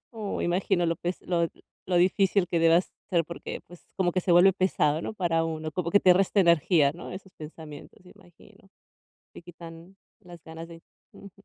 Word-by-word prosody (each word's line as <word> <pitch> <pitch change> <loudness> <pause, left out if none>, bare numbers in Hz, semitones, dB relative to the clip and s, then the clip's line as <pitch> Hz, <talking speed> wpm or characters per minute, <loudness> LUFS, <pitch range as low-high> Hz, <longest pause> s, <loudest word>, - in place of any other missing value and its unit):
Oh, 215 -3 -4
imagino 175 0 0
lo 165 -1 -1
pes 175 +2 -4
lo 170 -2 0 0.4
lo 180 -1 0
difícil 190 +1 +2
que 170 - -1
debe 165 +1 +5 0.3
ser, 170 -3 +2
porque 170 - -8
pues, 175 -1 -15 0.2
como 180 -2 0
que 185 - 0
se 180 - -3
vuelve 180 +3 +6
pesado, 160 -5 0
¿no?, 215 - -6
para 170 -4 0
uno. 155 -1 -4
Como 170 +1 -3
que 200 - +4
te 185 - +6
resta 195 +2 +1
energía, 170 -4 +3
¿no?, 175 - -10
esos 190 0 -10
pensamientos, 155 -1 -12
imagino. 195 +2 -20 0.7
Te - - -10
quitan 170 +1 -13 0.2
las 175 -2 -14
ganas 160 +1 -10
de 165 -1 -13 0.3
ujú. 200 - -13
175 Hz, 185 wpm, -26 LUFS, 165-185 Hz, 0.7 s, vuelve